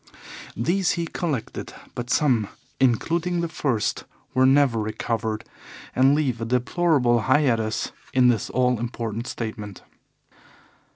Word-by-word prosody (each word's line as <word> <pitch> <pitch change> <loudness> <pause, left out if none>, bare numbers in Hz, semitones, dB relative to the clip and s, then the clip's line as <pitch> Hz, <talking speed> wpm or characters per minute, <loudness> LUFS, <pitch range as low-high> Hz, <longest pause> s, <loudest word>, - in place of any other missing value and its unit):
These 175 - +1
he 170 -1 -2
collected, 160 -7 -4 0.2
but 120 0 -5
some, 125 -9 +2 0.3
including 165 +8 +1
the 170 - -1
first, 130 -9 -1 0.3
were 130 +1 +4
never 135 -4 +4
recovered, 110 0 -2 0.5
and 135 +3 +5
leave 130 -6 0
a - - -1
deplorable 125 0 +2
hiatus 120 -6 +2 0.2
in 130 -1 +4
this 115 -5 +1
all 125 -2 +1
important 115 -1 -4
statement. 110 -4 -6
125 Hz, 115 wpm, -24 LUFS, 115-145 Hz, 0.5 s, and